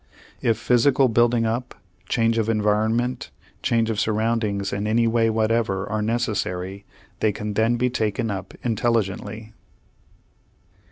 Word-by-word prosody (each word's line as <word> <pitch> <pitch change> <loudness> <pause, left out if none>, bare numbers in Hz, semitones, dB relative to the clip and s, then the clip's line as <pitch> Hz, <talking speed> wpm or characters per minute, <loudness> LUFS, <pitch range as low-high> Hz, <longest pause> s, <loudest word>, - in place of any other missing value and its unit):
If 115 -3 +2
physical 125 +3 +3
building 120 0 +3
up, 120 +3 -2 0.3
change 115 -1 +2
of 110 0 0
environment, 110 +3 0 0.3
change 115 -1 +1
of 105 - -2
surroundings 110 -2 0
in 100 +1 -2
any 115 +2 +2
way 115 0 +2
whatever 110 -3 0
are 110 +1 -2
necessary, 100 -4 -2 0.3
they 110 - +2
can 105 +1 -5
then 110 +3 +2
be 125 +1 0
taken 110 -1 -1
up 95 -1 -6
intelligently. 110 -1 -1
110 Hz, 125 wpm, -23 LUFS, 105-115 Hz, 0.3 s, physical